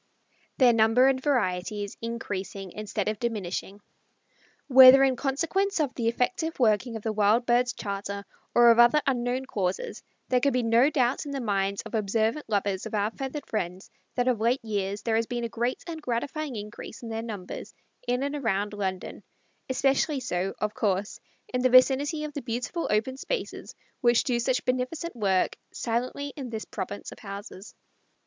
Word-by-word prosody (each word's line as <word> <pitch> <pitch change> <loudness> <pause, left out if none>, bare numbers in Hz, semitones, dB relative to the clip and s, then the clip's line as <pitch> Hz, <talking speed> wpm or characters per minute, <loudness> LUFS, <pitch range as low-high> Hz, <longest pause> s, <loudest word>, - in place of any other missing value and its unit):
Their 250 -3 +6
Number 225 +3 +5
and 265 -1 +3
Variety 210 -7 0
is 200 - -7
Increasing 200 -4 -5
Instead 210 -1 -4
of 215 -1 -1
Diminishing. 205 -3 -3 0.9
Whether 260 0 +9
in 265 -1 +3
consequence 330 +10 0
of 285 -4 0
the 230 -2 -2
effective 320 +8 -1
working 230 0 +2
of 220 - -6
the 220 - -1
Wild 215 +3 +3
Birds' 245 +1 +2
Charter 200 0 -5 0.3
or 240 0 +8
of 230 - +3
other 240 +5 +7
unknown 255 0 0
causes, 190 -6 -3 0.3
there 255 - +3
can 280 +2 +2
be 250 -1 +1
no 230 +4 +4
doubt 255 -3 +1
in - - -5
the 275 - -3
minds 200 -4 -1
of - - -10
observant 220 +5 0
lovers 200 -2 -1
of - - -5
our 210 +1 +1
feathered 270 +3 -5
friends 185 -2 -4 0.2
that 245 0 +1
of 240 -4 +1
late 235 +2 +1
years 200 -1 -2
there 225 -1 +1
has 225 0 0
been 240 -1 -3
a 235 - -2
great 240 +3 -2
and 325 -2 -6
gratifying 270 +2 -3
increase 210 +3 -8
in 230 - -6
their 225 0 -3
numbers 210 -5 -7 0.4
in 250 +2 0
and 285 +1 -2
around 210 -6 -1
London, 190 -3 -4 0.5
especially 275 +2 +1
so, 190 -5 -2
of 210 0 -2
course, 200 -1 -1 0.3
in 250 - +1
the 255 - +3
vicinity 275 +4 +4
of 300 -1 -5
the 285 - -4
beautiful 250 +8 -3
open 225 +5 0
spaces - - -5 0.2
which 240 -2 +4
do 245 -2 0
such 250 +1 0
beneficent 255 +7 -2
work 195 -5 +1 0.2
silently 250 +4 -3
in 265 -4 -6
this 220 -1 -5
province - - -6
of - - -12
houses. 200 -1 -9
235 Hz, 175 wpm, -27 LUFS, 210-260 Hz, 0.9 s, Whether